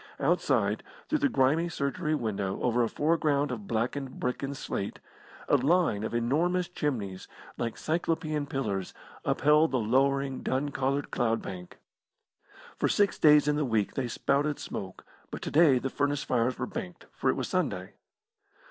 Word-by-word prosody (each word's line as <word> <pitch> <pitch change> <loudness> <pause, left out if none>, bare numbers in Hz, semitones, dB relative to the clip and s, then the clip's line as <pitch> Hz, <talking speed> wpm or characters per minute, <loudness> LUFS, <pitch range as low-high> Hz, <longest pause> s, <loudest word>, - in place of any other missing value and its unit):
Outside, - - +1 0.3
through 310 - +1
the 285 -1 +2
grimy 160 - +2
surgery 155 +1 -1
window 100 -7 -2
over 120 0 +2
a 115 - +1
foreground 150 -3 +1
of 105 -5 -6
blackened 125 +4 -2
brick 125 0 -2
and 140 0 -4
slate, 100 - -4 0.5
a 145 - +5
line 140 - +2
of 110 - -3
enormous 170 +10 +1
chimneys 115 - -3 0.3
like 115 -2 -3
Cyclopean 155 -2 -1
pillars 105 - -3 0.3
upheld 150 +2 +4
the 130 - 0
lowering, 135 +3 +1
dun 140 +2 -1
coloured 135 +1 -1
cloud 115 -1 0
bank. 90 -2 -8 1.0
For - - +1
six 205 -1 +2
days 150 -1 +6
in 150 0 +2
the 150 - +1
week 110 -6 0
they 130 -2 -2
spouted 145 +4 0
smoke, 95 -1 -7 0.2
but - - -7
to - - -4
day 150 -4 +6
the 135 +1 -2
furnace 145 0 0
fires 125 0 0
were - - -2
banked, 185 -6 -7
for - - -1
it - - +2
was - - -2
Sunday. - - -2
140 Hz, 160 wpm, -29 LUFS, 120-150 Hz, 1.0 s, days